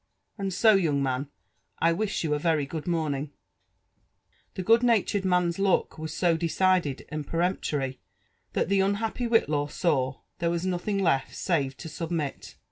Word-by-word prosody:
And 195 -2 -3
so^ 200 +1 +4
young 145 -5 +1
man, 130 +1 -1 0.5
I 165 +1 +3
wish 205 +2 -1
you 155 -2 0
a 150 - 0
very 155 -2 +1
good 155 +2 -6
morning/' 155 -4 -1 1.3
The 185 - -3
good 230 +5 +5
natured 220 -4 +2
man'a 180 0 +1
look 195 -4 +1
was 160 0 -5
so 170 0 +2
decided 170 -3 +1
and 150 -1 -5
peremptory, 150 -7 -1 0.5
that - - +1
the 195 +1 +2
unhappy 210 +5 0
Whitlaw 150 -11 +2
saw 135 -6 0 0.2
there 170 - +1
was 170 +1 -1
nothing 185 +2 -1
left 140 -2 0
«ave 145 -6 +2
to 165 - -8
submit. 160 -2 -4
170 Hz, 155 wpm, -27 LUFS, 150-190 Hz, 1.3 s, good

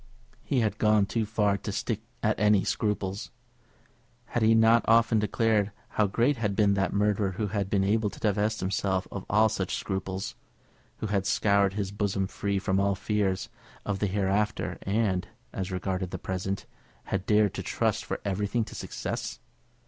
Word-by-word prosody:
He 135 -4 0
had 110 -1 -1
gone 105 -2 +4
too 110 +1 -1
far 105 -2 +1
to 105 - -4
stick 110 +1 -2 0.2
at 110 -1 +1
any 105 -2 +4
scruples. 100 -2 -2 1.0
Had 120 - -2
he 110 +1 +5
not 115 +1 +5
often 115 0 +5
declared 105 0 +1 0.2
how 105 - +2
great 120 +8 +2
had 105 -3 -1
been 100 -1 +4
that 95 0 +1
murderer 100 -1 +1
who 105 +2 -2
had 100 -1 -2
been 100 -1 +2
able 105 +2 +2
to - - -12
divest 105 +1 0
himself 95 0 0
of 100 - -6
all 110 +2 +5
such 100 -4 -2
scruples, 95 -1 -3 0.7
who - - -1
had 100 -2 0
scoured 100 -2 +3
his 100 -2 -2
bosom 100 -1 -1
free 100 +1 -2
from 95 0 +1
all 100 0 +2
fears 100 -1 -1 0.4
of 100 -2 -2
the 105 - +1
hereafter, 100 +2 0
and, 100 -2 0 0.3
as 95 0 -3
regarded 95 0 -2
the - - -4
present, 95 +1 -3 0.4
had 95 0 -3
dared 105 -2 +4
to - - -4
trust - - 0
for - - -4
everything 105 +4 0
to - - -11
success? - - -4
100 Hz, 170 wpm, -28 LUFS, 95-110 Hz, 1.0 s, he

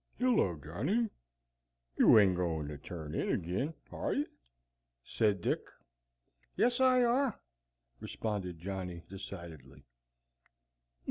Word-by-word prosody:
"Hello, 240 - +3
Johnny! 135 - -1 0.8
You - - +7
ain't 100 -4 +6
goin' 80 -4 -1
to 75 - -6
turn 80 -1 -7
in - - -1
agin, 100 - -1 0.2
are - - -2
ye?" 290 - +1 0.8
said 105 - +1
Dick. - - +1 1.0
"Yes, 245 +1 +3
I 255 -1 +5
are," 245 +1 +2 0.6
responded 100 -6 -4
Johnny, 90 -1 -5
decidedly. 85 -8 -9
95 Hz, 105 wpm, -33 LUFS, -, 1.0 s, You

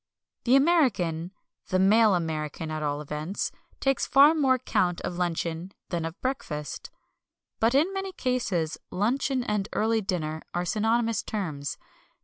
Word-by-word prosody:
The 250 +2 +5
American 225 - +2 0.4
the 185 - +1
male 210 +2 +5
American 160 -2 -3
at 155 0 -3
all 145 0 -1
events 150 +6 -3 0.3
takes 270 -1 +1
far 285 +3 +7
more 270 -5 +3
count 180 -8 0
of 180 0 -4
luncheon 170 +1 -2 0.2
than 170 -2 -2
of 165 +3 -6
breakfast. 150 - -4 0.7
But 230 +3 +3
in 325 +8 +3
many 385 0 -3
cases 210 - -1
luncheon 255 +6 0
and 210 -4 -1
early 225 +1 +2
dinner 160 -5 -2
are 175 0 0
synonymous 225 +3 +1
terms. 155 -10 -4
195 Hz, 135 wpm, -27 LUFS, 165-250 Hz, 0.7 s, far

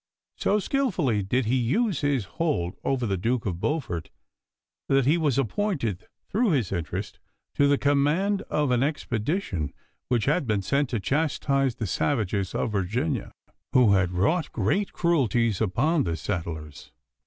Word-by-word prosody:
So 205 - +1
skilfully 190 - 0
did 120 +6 0
he 125 +4 +2
use 180 - +1
his 140 -7 +1
hold 95 - -1
over 130 -3 0
the 100 -3 0
Duke 115 +5 -1
of 90 -4 -2
Beaufort, 105 - -2 0.8
that 135 -2 +3
he 145 +5 +4
was 150 -7 +1
appointed 135 - -1 0.2
through 225 +3 +1
his 120 -10 0
interest 90 +2 -4 0.3
to 140 - +3
the 140 0 +4
command 150 +9 +2
of 150 -3 +1
an 125 -1 +2
expedition 125 - -2 0.3
which 120 -3 +1
had 150 0 +1
been 105 -3 0
sent 140 +6 +1
to 115 - -1
chastise 135 - 0
the 110 - -3
savages 100 -3 -1
of 115 - -1
Virginia, 110 - -1 0.4
who 120 -6 +6
had 95 -2 +3
wrought 110 - +1
great 200 0 0
cruelties 120 - +1
upon 135 - +2
the 85 -2 -2
settlers. 80 -5 -5
125 Hz, 150 wpm, -26 LUFS, 100-150 Hz, 0.8 s, who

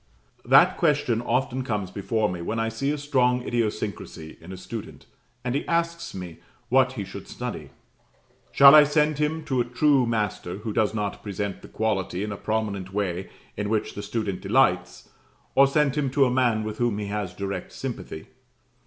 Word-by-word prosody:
That - - +6
question 145 -8 +1
often 125 +1 -1
comes 105 -6 -3
before 110 +2 0
me 90 -3 -5
when 110 +6 -2
I 115 0 0
see 115 +5 -2
a 150 - 0
strong 125 -4 +1
idiosyncrasy 105 -9 -3
in 85 +3 -11
a 95 - -7
student, 110 +3 -8 0.4
and 125 -1 -2
he 140 - -1
asks 170 -3 -1
me 90 -3 -7 0.3
what 130 0 +4
he 110 -6 -4
should 95 - -9
study. - - -6 0.8
Shall 140 0 +9
I 150 -1 +10
send 150 0 +1
him 155 +1 0
to 130 -4 +1
a - - +2
true 130 +1 +2
master, 105 -5 -2
who 105 +1 -5
does 110 0 +1
not 105 -2 -3
present 100 -1 -4
the - - -11
quality 100 -4 -1
in 105 - -4
a - - -3
prominent 105 -4 -2
way 95 -2 -2 0.3
in 105 0 -3
which 110 -1 -1
that 100 - -6
student 105 -2 -3
delights, 95 -4 +1 0.5
or 135 +1 +6
send 140 0 +2
him 145 -3 0
to 140 - +6
a 125 - +1
man 120 -4 +2
with 110 0 -5
whom 120 -4 +1
he 105 - -3
has 100 -3 -4
direct 100 +1 -4
sympathy? 80 - -6
110 Hz, 185 wpm, -25 LUFS, 100-130 Hz, 0.8 s, I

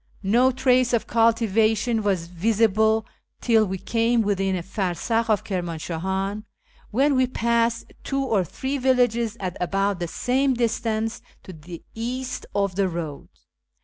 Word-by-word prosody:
No 235 +7 +4
trace 255 -1 +2
of 235 - +1
cultivation 225 0 +2
was 195 -5 0
visible 220 +4 +2 0.3
till 225 -3 +3
we 190 +1 -3
came 230 +3 +1
within 195 -2 0
o^farsakh 195 +5 -2
of 215 -2 +2
Kirmanshahan, 190 +3 -3 0.5
when 275 +5 +2
we 255 0 +3
passed 235 -1 0
two 275 0 -1
or 220 -7 +1
three 265 - -4
villages 245 -3 +1
at 185 -2 -4
about 195 +1 0
the 175 - -2
same 260 +9 0
distance 225 -1 -1 0.2
to 185 - -10
the 165 +1 -10
east 250 +3 -4
of 200 -2 +1
the 195 0 +1
road. 165 -4 -6
220 Hz, 135 wpm, -24 LUFS, 190-235 Hz, 0.5 s, No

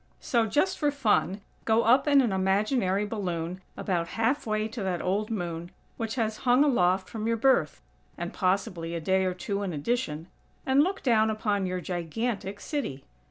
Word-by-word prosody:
So, 230 -3 +1
just 335 - +1
for 295 - +2
fun, 215 -7 +1 0.2
go 225 +1 +3
up 260 +5 +4
in 285 -1 +6
an 240 -5 +1
imaginary 195 +1 +1
balloon, 180 -4 -3 0.2
about 175 -3 -1
half 255 +4 +1
way 215 0 0
to 220 +1 -6
that 185 -3 -1
old 205 +4 -1
Moon, 175 -5 -4 0.3
which 225 0 -3
has 220 -3 -1
hung 250 +4 +4
aloft 190 -9 +2
from 220 -1 -4
your 230 0 +1
birth 265 +4 +2 0.3
(and - - -5
possibly 185 -3 -1
a - - -2
day 190 +3 +1
or 185 -1 -1
two 200 +2 -3
in 195 -4 -3
addition) 155 - -2 0.4
and 265 +1 +4
look 375 +5 -1
down 220 -4 +3
upon 210 -3 0
your 180 0 -3
"gigantic" 195 +4 -3
city. 205 - -4
210 Hz, 175 wpm, -28 LUFS, 185-235 Hz, 0.4 s, in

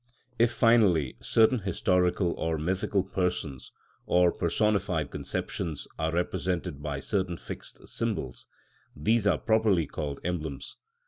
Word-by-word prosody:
If, 120 0 +4
finally, 110 - +4
certain 115 +2 +3
historical 90 -2 +1
or 80 -1 -1
mythical 95 +4 0
persons, 90 -8 -3 0.4
or 90 -1 +4
personified 90 -4 0
conceptions, 80 -4 -4
are 80 0 0
represented 85 -3 -2
by 75 -2 -3
certain 95 -2 -1
fixed - - -8
symbols, 65 - -3 0.5
these 105 +8 +2
are 90 -6 +4
properly 110 -6 +2
called 70 -1 -5
emblems. 80 -5 -4
90 Hz, 115 wpm, -28 LUFS, 80-100 Hz, 0.5 s, If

